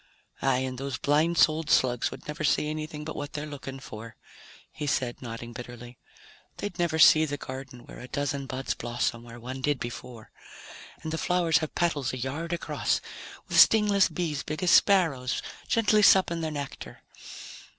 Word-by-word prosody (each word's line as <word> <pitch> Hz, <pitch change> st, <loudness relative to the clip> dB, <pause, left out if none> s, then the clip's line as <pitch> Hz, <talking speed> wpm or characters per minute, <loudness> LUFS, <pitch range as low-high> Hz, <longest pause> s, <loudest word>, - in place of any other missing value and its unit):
"Aye, 130 Hz, -1 st, +2 dB
and 130 Hz, -1 st, -4 dB
those 135 Hz, -1 st, -3 dB
blind 155 Hz, +5 st, +2 dB
souled 155 Hz, 0 st, +3 dB
slugs 125 Hz, -4 st, +3 dB
would -, -, -11 dB
never 150 Hz, +2 st, -5 dB
see 150 Hz, 0 st, +2 dB
anything 155 Hz, 0 st, -5 dB
but 160 Hz, -, -5 dB
what 145 Hz, 0 st, -6 dB
they're 150 Hz, 0 st, -4 dB
looking 135 Hz, -2 st, -7 dB
for," 115 Hz, -3 st, -10 dB, 0.6 s
he 150 Hz, -2 st, -5 dB
said, 125 Hz, -3 st, -1 dB
nodding 120 Hz, -1 st, -7 dB
bitterly. 120 Hz, 0 st, -10 dB, 0.6 s
"They'd 200 Hz, -3 st, -5 dB
never 170 Hz, -2 st, +1 dB
see 160 Hz, 0 st, +7 dB
the 145 Hz, -1 st, -4 dB
garden 130 Hz, -2 st, -8 dB
where -, -, -11 dB
a 125 Hz, -, -9 dB
dozen 140 Hz, 0 st, -3 dB
buds 130 Hz, +1 st, -3 dB
blossom 120 Hz, 0 st, -2 dB
where 120 Hz, 0 st, -11 dB
one 130 Hz, +3 st, -6 dB
did 145 Hz, 0 st, 0 dB
before, 120 Hz, -1 st, -8 dB, 0.7 s
and 160 Hz, -, -4 dB
the 160 Hz, -, -2 dB
flowers 175 Hz, -3 st, +2 dB
have 155 Hz, -, -5 dB
petals 150 Hz, -8 st, 0 dB
a -, -, -3 dB
yard 145 Hz, +7 st, -4 dB
across, 170 Hz, -, -1 dB, 0.5 s
with -, -, +2 dB
stingless 205 Hz, -3 st, +6 dB
bees 155 Hz, -5 st, -2 dB
big 155 Hz, +4 st, -5 dB
as 175 Hz, -, +3 dB
sparrows 160 Hz, -11 st, +4 dB, 0.3 s
gently 215 Hz, -2 st, +3 dB
supping 185 Hz, -4 st, +5 dB
their 160 Hz, -, -2 dB
nectar. 145 Hz, -2 st, -7 dB
145 Hz, 170 wpm, -27 LUFS, 125-160 Hz, 0.7 s, see